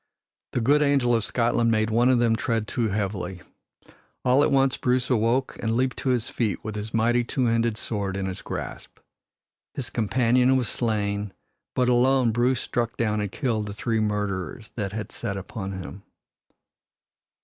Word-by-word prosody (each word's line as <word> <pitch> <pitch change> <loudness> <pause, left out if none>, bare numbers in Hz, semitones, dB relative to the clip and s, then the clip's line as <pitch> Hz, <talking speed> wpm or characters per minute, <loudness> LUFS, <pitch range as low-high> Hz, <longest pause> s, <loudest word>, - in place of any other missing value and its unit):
The 125 - 0
good 145 +6 +4
angel 140 -4 +3
of 115 -2 +2
Scotland 115 0 +1
made 110 -1 +1
one 120 +3 +4
of 130 - +4
them 120 -1 +3
tread 115 -1 -1
too 115 0 0
heavily. 95 -3 -3 0.8
All 130 +3 +5
at - - +3
once 135 -1 +3
Bruce 125 +1 0
awoke 120 +3 +1
and 115 0 0
leaped 130 0 0
to 135 - -2
his 120 -3 +1
feet 110 -6 -2
with 110 - -4
his 105 +1 -5
mighty 120 +2 +2
two 125 +2 -1
handed 115 -1 +1
sword 100 -3 -3
in 95 - -2
his 95 -1 -4
grasp. - - -6 0.8
His 125 -3 -5
companion 125 +3 +3
was 125 -3 0
slain, 105 -3 -1 0.4
but 125 -1 +2
alone 125 0 +4
Bruce 120 +3 +1
struck 120 -1 -2
down 105 -2 0
and 105 -2 -3
killed 110 -4 -1
the 100 - -5
three 110 +2 -1
murderers 105 +1 -2
that 100 -4 -3
had 105 +1 -5
set 100 -4 -4
upon 95 0 -5
him. 95 +1 -7
115 Hz, 170 wpm, -25 LUFS, 105-125 Hz, 0.8 s, All